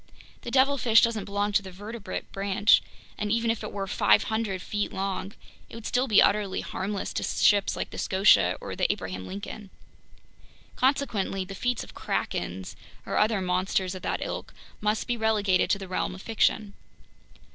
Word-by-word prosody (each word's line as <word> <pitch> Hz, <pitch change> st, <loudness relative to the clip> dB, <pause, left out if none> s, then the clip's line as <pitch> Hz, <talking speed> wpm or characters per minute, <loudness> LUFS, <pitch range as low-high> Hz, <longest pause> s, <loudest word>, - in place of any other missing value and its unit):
The -, -, -6 dB
devilfish 260 Hz, -3 st, +4 dB
doesn't 230 Hz, -4 st, +1 dB
belong 205 Hz, +1 st, -1 dB
to 200 Hz, -, +3 dB
the 190 Hz, -, -9 dB
vertebrate 205 Hz, +1 st, -7 dB
branch, 200 Hz, +1 st, +3 dB, 0.4 s
and 210 Hz, 0 st, -1 dB
even 230 Hz, 0 st, +2 dB
if 225 Hz, -, -3 dB
it 215 Hz, -, -5 dB
were 195 Hz, -1 st, -3 dB
500 215 Hz, 0 st, +2 dB
feet 205 Hz, +3 st, -3 dB
long, 195 Hz, +1 st, -3 dB, 0.4 s
it -, -, -11 dB
would 230 Hz, -, -9 dB
still 250 Hz, +2 st, +1 dB
be 215 Hz, -4 st, +6 dB
utterly 200 Hz, -2 st, +1 dB
harmless 200 Hz, +1 st, -4 dB
to -, -, -2 dB
ships 205 Hz, -2 st, +3 dB
like -, -, -4 dB
the -, -, -7 dB
Scotia 195 Hz, +2 st, +4 dB
or -, -, -6 dB
the -, -, +2 dB
Abraham 95 Hz, 0 st, -5 dB
Lincoln. 200 Hz, +1 st, -7 dB, 1.1 s
Consequently, 225 Hz, -8 st, 0 dB
the 195 Hz, -, -8 dB
feats 245 Hz, +4 st, -1 dB
of -, -, -13 dB
krakens 90 Hz, +1 st, -3 dB, 0.3 s
or -, -, -2 dB
other 210 Hz, -2 st, +2 dB
monsters 185 Hz, 0 st, 0 dB
of 185 Hz, -, -7 dB
that -, -, -2 dB
ilk -, -, -6 dB, 0.2 s
must 210 Hz, 0 st, 0 dB
be 240 Hz, -, -1 dB
relegated 210 Hz, -4 st, +2 dB
to -, -, +3 dB
the 195 Hz, -1 st, -8 dB
realm 185 Hz, 0 st, -2 dB
of 190 Hz, -, -11 dB
fiction." 215 Hz, -2 st, +1 dB
205 Hz, 170 wpm, -27 LUFS, 190-220 Hz, 1.1 s, be